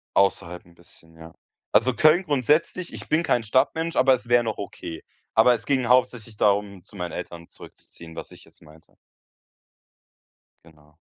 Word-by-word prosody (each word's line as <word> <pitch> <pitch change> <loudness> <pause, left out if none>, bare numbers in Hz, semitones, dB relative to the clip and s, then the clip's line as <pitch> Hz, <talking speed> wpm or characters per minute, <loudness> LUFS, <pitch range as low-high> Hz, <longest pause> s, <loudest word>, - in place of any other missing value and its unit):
Außerhalb 90 -3 0
'n 85 - -22
bisschen, 80 -1 -15
ja. 80 0 -13 0.4
Also, 115 +4 +3
Köln 155 +8 +4
grundsätzlich 150 +4 0
ich - - -10
bin 160 +2 +2
kein 120 -7 +1
Stadtmensch, 155 +8 0
aber 130 +1 +4
es 120 -1 -4
wäre 120 0 +4
noch 110 -1 -4
okay. 85 -5 -8 0.3
Aber, 120 +2 +5
es 115 0 -10
ging 130 -4 0
hauptsächlich 125 -3 +1
darum, 100 -2 0
zu - - -18
meinen 90 -2 -5
Eltern 85 -1 -8
zurückzuziehen, 80 -1 -14
was - - -8
ich - - -15
jetzt - - -21
meinte. 80 0 -20 1.7
Genau. 75 -2 -22
110 Hz, 160 wpm, -24 LUFS, 85-130 Hz, 1.7 s, Aber